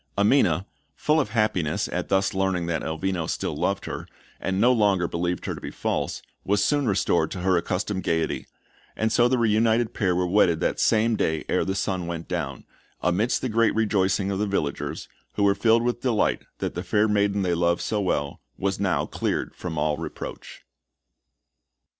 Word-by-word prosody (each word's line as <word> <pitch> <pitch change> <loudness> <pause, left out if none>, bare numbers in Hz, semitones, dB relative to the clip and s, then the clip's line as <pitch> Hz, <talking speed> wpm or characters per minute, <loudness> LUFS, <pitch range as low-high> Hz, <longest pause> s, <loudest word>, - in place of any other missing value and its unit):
Amina, 100 - +3 0.3
full 155 +1 +2
of 120 - 0
happiness 105 -8 0
at - - -3
thus 95 +2 +2
learning 95 -2 0
that 85 -2 -1
Elvino 85 +1 -2
still - - -2
loved - - -1
her, - - -6 0.3
and 95 0 -1
no 125 +4 +5
longer 100 -6 +2
believed 85 +1 -2
her - - -2
to - - -9
be - - -5
false, - - -2 0.2
was 100 +1 +2
soon 145 +2 +1
restored 100 -2 +2
to 90 - -5
her 95 0 +2
accustomed 95 +2 -1
gaiety; 80 -2 -1 0.5
and 110 0 0
so 120 +1 +4
the 130 +1 +2
reunited 115 0 +2
pair 95 -5 +1
were 90 0 +1
wedded 90 -3 +3
that - - -1
same 110 +1 +3
day 80 -6 -1
ere - - +1
the 95 - -2
sun 95 -2 -2
went 85 -1 -5
down, 75 -7 -3 0.4
amidst 100 +7 +1
the - - +1
great 115 0 +2
rejoicings 100 -2 +1
of 95 - -2
the 105 - 0
villagers, 80 -8 -2 0.3
who 105 - 0
were 100 0 +5
filled 115 +2 +3
with 120 0 -1
delight 120 -5 +1
that - - -3
the 90 - -3
fair 105 +4 +2
maiden 100 -1 +1
they 90 -2 +1
loved 85 0 +1
so 105 -1 -1
well 70 -7 -1 0.2
was 95 0 -1
now 100 -2 +1
cleared - - -2
from 85 -3 -5
all 75 0 +1
reproach. 80 - -7
95 Hz, 185 wpm, -25 LUFS, 90-110 Hz, 0.5 s, no